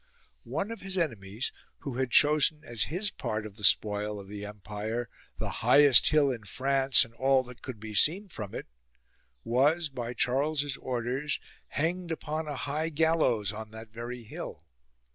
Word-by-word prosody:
One 160 - -2
of 230 - -7
his 190 -1 -3
enemies, 110 - -2 0.3
who 135 -4 -5
had 130 -1 0
chosen 150 +2 +5
as 120 -7 -1
his 195 +6 -1
part 110 0 -3
of 105 -2 -9
the 105 - -13
spoil 105 +1 +3
of 100 - -10
the 105 0 -7
empire 105 +3 -5 0.3
the - - -3
highest 140 -4 +7
hill 150 -3 +4
in 115 -4 -6
France 135 +5 +3
and 115 - -18
all 130 +2 +3
that 125 -1 -13
could 125 -5 -7
be 110 0 -7
seen 175 - +4
from 105 - -7
it, - - -5 0.8
was, 145 +7 +2
by 125 -2 -5
Charles's 140 +3 0
orders, 130 +3 -2 0.3
hanged 170 +3 -1
upon 155 -1 -3
a 145 - -4
high 150 +4 -2
gallows 150 -10 +2
on 110 0 -7
that 110 +1 -11
very 120 +2 -7
hill. 105 -7 -8
130 Hz, 165 wpm, -29 LUFS, 110-150 Hz, 0.8 s, highest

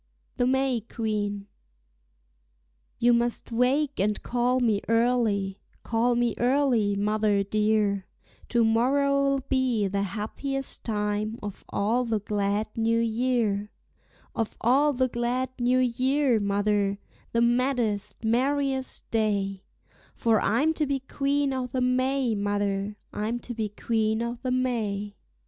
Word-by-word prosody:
THE 245 -1 +2
MAY 265 -2 +1
QUEEN. 205 -3 -2 1.5
You 240 +1 +4
must 235 0 0
wake 265 +5 +1
and 210 +2 +1
call 245 +1 +1
me 220 -5 +2
early, 225 -5 +1 0.2
call 240 +1 +1
me 240 -1 +1
early, 245 -5 +2
mother 210 0 +1
dear; 210 -1 +1 0.4
To 235 -1 +3
morrow'll 275 +4 +2
be 255 -6 +1
the 200 +1 -1
happiest 230 +8 -3
time 210 0 -2
of 205 -2 -7
all 230 +5 +1
the 225 -3 -1
glad 205 +1 -1
new 230 0 +1
year, 230 -3 0 0.6
Of 225 -2 -3
all 275 +6 +3
the 260 -1 +1
glad 245 +1 -1
new 245 +1 +2
year, 255 0 +2
mother, 200 0 +1 0.3
the 230 - +1
maddest, 240 -4 0
merriest 265 +3 0
day; 200 -3 0 0.5
For 225 -2 +2
I'm 295 +9 +2
to 305 -2 0
be 275 -1 0
Queen 280 +1 0
o' 255 -1 -2
the 255 +1 -3
May, 255 0 +1
mother, 205 0 -1 0.2
I'm 220 +3 -2
to 240 - -6
be 220 -2 -2
Queen 220 +1 0
o' 235 0 -4
the 255 - -2
May. 220 -5 -1
230 Hz, 125 wpm, -26 LUFS, 210-255 Hz, 1.5 s, You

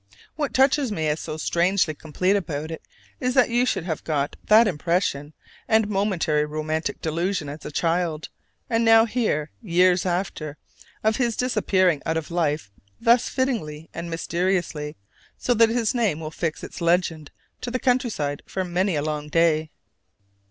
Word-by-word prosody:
What 295 -3 -2
touches 270 -1 +3
me 160 -6 -1
as 150 +1 -1
so 155 -1 -5
strangely 175 +1 +1
complete 170 +6 0
about 155 -4 -3
it 160 - -6 0.4
is 250 0 -1
that 255 -3 +4
you 245 +2 +2
should - - 0
have 165 -3 -4
got 145 -2 -1
that 220 +2 +6
impression 155 -3 -1 0.3
and 220 -1 +3
momentary 190 -7 +1
romantic 155 +1 -3
delusion 165 +1 -1
as 150 +2 -8
a - - -5
child, 165 0 -1 0.4
and 230 0 +1
now 225 0 +7
hear, 215 -11 -1
years 180 -2 +3
after, 175 -4 -3 0.5
of 220 0 +2
his 240 -3 0
disappearing 190 - +2
out 160 0 -1
of 160 +1 -5
life 155 -9 -1 0.3
thus 235 +1 +4
fittingly 185 - -2
and 170 +1 -5
mysteriously, 170 -2 -1 0.4
so 245 - +1
that 230 -1 +5
his 230 0 +1
name 220 -11 +1
will 155 -1 -6
fix 160 -1 -3
its - - -8
legend 170 -3 +1 0.3
to 245 - -3
the 255 - -1
countryside 235 - 0
for 190 - -2
many 180 +1 0
a 145 - 0
long 150 -1 -3
day. 160 -1 +2
175 Hz, 160 wpm, -24 LUFS, 155-220 Hz, 0.5 s, now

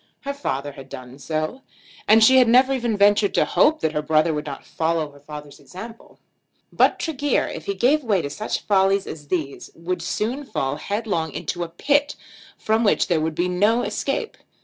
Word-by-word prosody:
Her 280 0 -4
father 145 - -3
had 135 -1 -12
done 130 +1 -10
so, 155 - -3 0.5
and 220 +1 +6
she 260 +4 +7
had 255 -2 +6
never 255 +3 +5
even 235 -5 -1
ventured 205 0 +3
to - - +3
hope 315 +1 +3
that 160 - +1
her 150 -1 -1
brother 155 +1 +2
would 150 0 -4
not 140 - -7
follow 160 -2 -1
her 145 - -17
father's 150 0 -10
example. 225 +5 -11 0.6
But - - +3
Tregear, 290 -3 0
if - - -8
he 400 - -1
gave 290 +2 +2
way 205 -7 +1
to 140 - -3
such 210 +8 -3
follies 195 -1 +2
as 150 -2 -9
these, 150 -5 -3
would 170 +1 -4
soon 220 +10 -2
fall 135 - -3
headlong 200 -6 -2
into 175 - -4
a 170 - -6
pit 285 - +1 0.4
from 220 +1 +1
which 205 - +2
there 165 -3 +2
would 160 0 -2
be 175 +3 0
no 205 +7 +2
escape. 475 -3 -3
190 Hz, 195 wpm, -22 LUFS, 155-235 Hz, 0.6 s, she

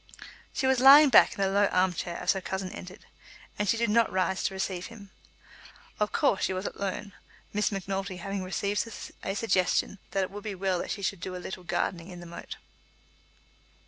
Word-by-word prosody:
She 265 - -2
was 260 -1 +3
lying 280 +3 +9
back - - +6
in - - -4
a 195 - +3
low 200 +1 +3
arm 185 -1 +2
chair 170 +1 -4
as 180 - +2
her 190 - -4
cousin 190 0 -4
entered, 185 +2 -10 0.5
and 210 -2 0
she 230 - +3
did 230 -2 +1
not 230 +1 +3
rise 190 0 0
to 195 - 0
receive 185 -1 -3
him. 205 -4 -13 0.9
Of 210 0 +1
course 195 - +2
she - - -1
was 185 +2 -4
alone, 200 +1 -4 0.4
Miss 210 +1 +1
Macnulty 195 -1 -3
having 195 +2 -4
received 200 +4 -2 0.3
a 195 - -3
suggestion 195 -2 +1
that 195 - 0
it 185 - -4
would 205 0 -8
be 210 -2 -4
well 185 -1 0
that - - -4
she 200 - -4
should 195 -1 -1
do 185 +1 -5
a - - -4
little 180 0 -7
gardening 170 0 -2
in 180 -1 -9
the 175 - -10
moat. 170 - -8
195 Hz, 205 wpm, -28 LUFS, 185-205 Hz, 0.9 s, lying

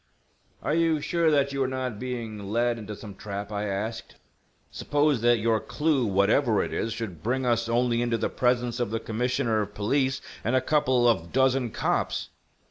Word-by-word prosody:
"Are - - 0
you 165 -1 +2
sure 170 +2 +1
that 140 -2 +2
you 140 - -1
are 130 - +2
not 130 -4 -3
being 120 -4 -5
led 120 +2 +1
into 105 -1 -7
some 100 0 -9
trap?" 100 +1 -6
I 105 0 -2
asked. 105 +3 -4 0.6
"Suppose 145 -4 +1
that 120 0 +4
your 110 0 +1
clue, 150 -4 0
whatever 105 +4 +3
it - - -5
is, 115 - -1
should 110 -8 -5
bring 130 +5 -1
us 115 -1 +1
only 120 0 +2
into 120 -1 0
the - - 0
presence 125 -1 0
of 120 - 0
the 115 +1 -2
Commissioner 115 -1 0
of 105 0 -6
Police 130 +5 +1 0.2
and 120 +4 +1
a - - +5
couple 130 -3 +2
of 90 -8 +1
dozen 130 -1 +2
cops!" - - -1
120 Hz, 185 wpm, -26 LUFS, 110-130 Hz, 0.6 s, a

